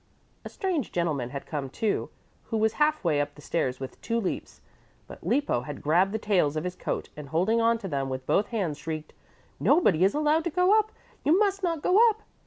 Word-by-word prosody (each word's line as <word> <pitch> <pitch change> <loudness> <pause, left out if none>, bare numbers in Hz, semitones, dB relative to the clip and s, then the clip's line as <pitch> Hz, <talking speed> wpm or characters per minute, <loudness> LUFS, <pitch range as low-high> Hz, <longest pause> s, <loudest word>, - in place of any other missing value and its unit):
A - - -7
strange 365 - -2
gentleman 155 -8 -1
had 140 +1 -6
come, 145 -4 -4
too, 215 - -1 0.4
who 225 - -2
was 220 0 +2
half 305 -3 +3
way 155 -5 +2
up 145 0 -4
the 150 - -14
stairs 130 -6 -1
with 130 0 -8
two 230 +1 -1
leaps. 195 - -4 0.5
But - - -12
Lippo 280 - +1
had 145 +3 -8
grabbed 175 +6 +3
the 220 - -1
tails 185 -9 +1
of 155 - -2
his 180 0 -4
coat - - -4
and, 150 -2 -9
holding 190 +9 +2
on 230 0 +3
to 215 -4 -6
them 135 -5 -2
with 130 0 -5
both 205 - +2
hands, 180 -10 -2
shrieked, 155 -1 -6 0.5
"Nobody 190 - +4
is 195 +6 +3
allowed 305 +2 +2
to - - +1
go 360 +5 +3
up. 435 0 -2 0.3
You 315 +5 +4
must 395 -1 +1
not 330 -5 -1
go 375 +3 +4
up." 435 0 -5
195 Hz, 215 wpm, -27 LUFS, -, 0.5 s, Nobody